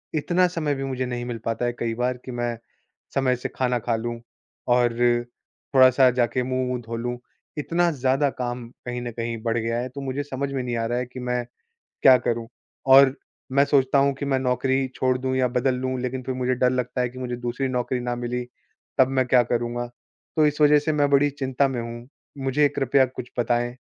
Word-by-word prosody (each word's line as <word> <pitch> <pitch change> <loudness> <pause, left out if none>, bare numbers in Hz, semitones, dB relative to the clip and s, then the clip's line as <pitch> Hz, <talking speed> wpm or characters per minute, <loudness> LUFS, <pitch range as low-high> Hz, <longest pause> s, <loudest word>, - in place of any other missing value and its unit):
इतना 175 +4 +2
समय 155 -5 -1
भी 135 - -4
मुझे 130 -1 -2
नहीं 120 -1 -4
मिल 120 -1 -4
पाता 115 +1 -1
है 120 - 0
कई 115 -1 -1
बार 125 +1 -1
कि 130 - -6
मैं 120 -1 -2 0.6
समय 130 -2 +2
से 125 - -5
खाना 125 -1 +1
खा 115 0 -1
लूँ 120 +1 -4 0.6
और 120 -1 +2 0.8
थोड़ा-सा 130 0 +7
जाके 125 0 0
मुँह-वुह 130 0 -1
धो 115 0 -6
लूँ। 120 +1 -3 0.4
इतना 170 +4 +1
ज़्यादा 135 +1 +1
काम 120 -1 -3 0.2
कहीं 125 0 -4
न 120 -1 -4
कहीं 115 0 -4
बढ़ 115 -1 0
गया 115 0 -1
है, 125 +1 -3
तो 140 +2 -8
मुझे 135 +1 -3
समझ 140 0 -4
में 135 - -1
नहीं 120 -1 -2
आ 115 - -1
रहा 120 +1 -1
है 125 - -2
कि 125 +1 -10
मैं 125 -1 -2 0.6
क्या 130 -1 +9
करूँ? 115 -1 -2 0.4
और 135 0 +7 0.4
मैं 140 +1 +5
सोचता 140 -1 +3
हूँ 140 0 +3
कि 140 - -4
मैं 135 -1 +1
नौकरी 130 +1 +1
छोड़ 130 -1 +1
दूँ 130 0 -2
या 130 -1 +2
बदल 125 +1 0
लूँ, 130 0 -2
लेकिन 130 +1 -3
फ़िर 130 +1 -3
मुझे 130 0 0
डर 125 0 +3
लगता 125 0 -1
है 125 - 0
कि 130 - -11
मुझे 125 -1 -3
दूसरी 125 +2 -2
नौकरी 125 0 -1
ना 120 0 -2
मिली 120 0 -3 0.6
तब 130 - +7
मैं 130 - +3
क्या 125 -1 +5
करूँगा। 120 0 -2 0.5
तो 155 - +5
इस 150 +1 -2
वज़ह 150 0 +6
से 155 +1 -1
मैं 145 -1 +2
बड़ी 140 +1 +4
चिंता 135 -1 0
में 125 -3 -3
हूँ। 120 +2 -8 0.4
मुझे 145 +3 +3
कृपया 135 -1 +2
कुछ 125 -1 -8
बताएँ? 120 +1 0
125 Hz, 215 wpm, -24 LUFS, 120-135 Hz, 0.8 s, क्या